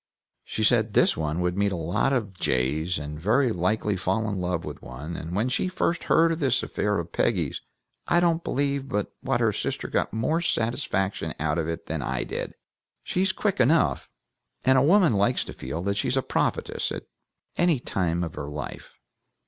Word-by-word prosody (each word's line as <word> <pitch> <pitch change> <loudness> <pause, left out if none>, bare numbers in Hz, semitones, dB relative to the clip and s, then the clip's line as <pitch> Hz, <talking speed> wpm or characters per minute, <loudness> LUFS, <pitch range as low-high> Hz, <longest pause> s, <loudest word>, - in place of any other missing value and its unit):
She 110 - -3
said 110 -2 +3
this - - +5
one 80 +2 -2
would 90 0 0
meet 100 0 +1
a - - -1
lot 85 +10 0
of 110 -8 -1
jays, 75 +3 0
and 75 +1 -6
very 115 - +3
likely 105 +2 0
fall 95 +4 0
in 100 -3 -2
love 90 -2 -1
with - - -7
one; 70 +7 -7
and 85 +2 -5
when 115 +6 +1
we - - 0
first 175 -2 -1
heard 165 0 +4
of 165 - -2
this 130 -5 +2
affair 105 -1 -1
of 85 0 -4
Peggy's - - 0 0.5
I 175 - +4
don't 170 -1 +2
believe 140 0 -1
but 105 -5 -2
what - - 0
her - - +3
sister - - -2
got - - 0
more 130 +10 0
satisfaction 110 - -1
out 80 +1 0
of 80 - -1
it 85 0 -4
than 80 -2 -3
I 65 -1 -1
did. - - -5 0.5
She's 185 +1 +1
quick 195 -2 -1
enough! 130 - +3 0.6
And 130 +1 +5
a 130 - +5
woman 170 - +5
likes 100 +5 +2
to - - -8
feel 75 +7 -5
that 100 +1 -1
she's 130 - +1
a 135 - +1
prophetess - - -1
at - - -4 0.5
any 175 -6 +3
time 90 -7 -1
of 80 - -4
her 70 - -5
life. 75 -1 -7
100 Hz, 195 wpm, -26 LUFS, 85-135 Hz, 0.6 s, this